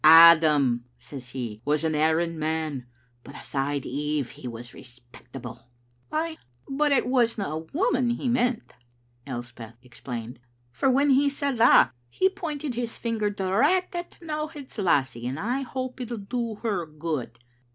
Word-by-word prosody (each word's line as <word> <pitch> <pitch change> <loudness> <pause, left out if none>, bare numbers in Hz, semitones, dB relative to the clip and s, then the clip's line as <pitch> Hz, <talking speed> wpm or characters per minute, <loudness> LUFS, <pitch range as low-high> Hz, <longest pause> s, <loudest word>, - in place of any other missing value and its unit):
'Adam,' 155 -6 +8
says 125 0 -9
he, 120 -4 -5
'was 150 +3 +1
an 160 -1 +1
erring 160 +2 +1
man, 155 -5 -2 0.4
but 140 - -12
aside 140 0 -2
Eve 145 0 -2
he - - -9
was 120 0 -8
respectable. 125 -1 -11
' 120 0 -39
" 120 - -38
"Ay, 315 +1 -2 0.3
but 290 +2 +1
it 275 - +3
wasna 240 -4 +2
a' 160 +1 -5
women 260 -7 +2
he 240 +2 -1
meant," 245 -1 0 0.5
Elspeth 120 -2 -7
ex 120 - -16
plained, 120 -2 -6 0.2
" 120 0 -39
for 265 - +1
when 275 +2 +4
he 280 +2 +4
said 280 -3 -2
that, 235 - +7 0.2
he 380 - +2
pointed 305 -7 -4
his 235 -1 -4
finger 225 -3 -1
direct 225 - +1
at 345 0 -4
T'nowhead's 305 -6 -6
lassie, 130 - +1
and 135 +4 -3
I 245 +8 -1
hope 255 0 -5
it'll 240 -1 -4
do 230 +2 -3
her 200 -7 -1
good." 150 -6 -4
165 Hz, 160 wpm, -26 LUFS, -, 0.5 s, Adam